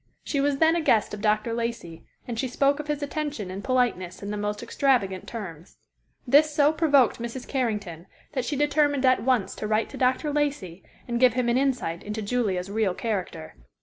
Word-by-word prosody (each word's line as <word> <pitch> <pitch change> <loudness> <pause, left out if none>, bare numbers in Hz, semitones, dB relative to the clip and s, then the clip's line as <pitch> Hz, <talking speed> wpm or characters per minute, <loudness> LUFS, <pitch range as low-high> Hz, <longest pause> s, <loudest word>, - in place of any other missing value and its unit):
She 280 - -1
was 285 0 +1
then 320 +2 +4
a 340 - +1
guest 220 -10 +2
of 210 - -6
Dr. 215 +2 +1
Lacey, 230 -8 -4 0.2
and 235 -2 -4
she 260 - 0
spoke 275 +3 +1
of 300 - -5
his 295 -1 -2
attention 285 -9 -4
and 195 +2 -6
politeness 220 -8 0
in 200 - -4
the - - -3
most 210 +1 -3
extravagant 235 -7 0
terms. 185 -7 -8 0.5
This 290 +4 +5
so 295 0 +3
provoked 285 -8 +3
Mrs. 235 +2 -6
Carrington 210 - -3 0.2
that 260 -4 -2
she 290 - -2
determined 290 -1 +2
at 255 0 +4
once 250 -5 +1
to 215 - -4
write 215 +1 +1
to - - -9
Dr. 260 +4 +1
Lacey, 280 - -2 0.2
and 235 -1 -1
give 250 -2 +5
him 250 -1 0
an 235 - +2
insight 250 -11 -1
into 210 +1 -5
Julia's 200 -5 -1
real 205 -4 0
character. 190 - -4
240 Hz, 195 wpm, -26 LUFS, 205-280 Hz, 0.5 s, This